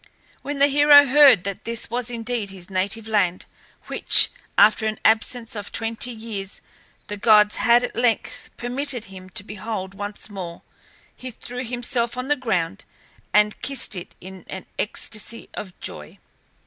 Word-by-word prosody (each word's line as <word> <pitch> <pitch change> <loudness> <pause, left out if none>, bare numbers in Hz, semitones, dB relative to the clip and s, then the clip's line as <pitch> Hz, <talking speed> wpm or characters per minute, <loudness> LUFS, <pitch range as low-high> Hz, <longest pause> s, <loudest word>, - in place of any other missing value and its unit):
When 290 0 -4
the 280 - +5
hero 290 0 +7
heard 270 -7 +6
that 200 -1 -5
this 230 -1 -4
was 245 0 -2
indeed 235 -3 -3
his 190 -1 -10
native 200 +4 -2
land, 190 -5 0 0.4
which, - - +5 0.3
after 220 +1 +5
an 215 - -2
absence 225 +1 +1
of 205 -1 -6
twenty 225 +2 -2
years, 220 -4 -6 0.5
the 205 - -6
gods 210 -1 +5
had 240 0 +4
at - - -4
length 235 -1 -1
permitted 250 0 -3
him 185 0 -11
to 190 - -6
behold 205 -2 -6
once 205 +1 -5
more, 185 -5 -8 0.5
he 255 - -8
threw 245 +1 -7
himself 240 0 -1
on 255 +2 -3
the 295 - +4
ground, 195 - -2 0.5
and 210 0 +3
kissed 275 -6 -1
it 180 -1 -8
in 185 0 -11
an 190 - -7
ecstacy 215 +1 -4
of 185 -3 -8
joy. 75 0 -8
220 Hz, 155 wpm, -23 LUFS, 200-245 Hz, 0.5 s, hero